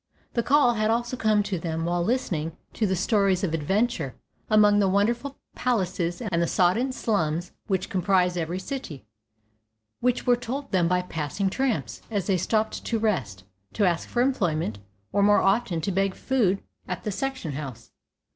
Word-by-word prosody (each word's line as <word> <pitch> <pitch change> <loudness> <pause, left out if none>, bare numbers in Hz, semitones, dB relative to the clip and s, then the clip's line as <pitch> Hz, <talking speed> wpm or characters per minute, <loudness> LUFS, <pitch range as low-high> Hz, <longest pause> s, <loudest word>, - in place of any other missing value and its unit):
The 235 - +1
"call" 270 -1 +4
had 215 -1 0
also 240 +2 0
come 215 -3 +2
to 195 -3 -3
them 165 -1 -2
while 175 0 0
listening 170 -8 -1 0.2
to 215 - 0
the 190 - +1
stories 195 -1 +2
of 170 -4 0
adventure 170 - 0 0.3
among 210 -1 +5
the 195 -2 +3
wonderful 235 +8 0 0.2
palaces 185 -6 -1
and 180 -6 0
the 170 - +2
sodden 205 +12 +2
slums 175 -8 -1 0.2
which 190 -2 0
comprise 185 -1 +2
every 170 +1 -2
city, 185 - -6 0.9
which 250 0 0
were 245 - +5
told 270 +4 -5
them 180 -4 +3
by 180 +1 +1
passing 180 +3 -2
tramps 220 - -1
as 200 -5 -1
they 190 -2 +2
stopped 215 +4 0
to 230 - 0
rest, 130 - -1 0.3
to 210 - +2
ask 170 -2 0
for 240 - +2
employment, 165 - 0 0.3
or 200 - +2
more 205 +1 +5
often 195 -4 +2
to 195 - -1
beg 195 0 0
food 215 -8 +1 0.2
at 180 - -4
the 210 - -2
section 260 - -3
house. 135 -4 -7
195 Hz, 170 wpm, -26 LUFS, 170-230 Hz, 0.9 s, among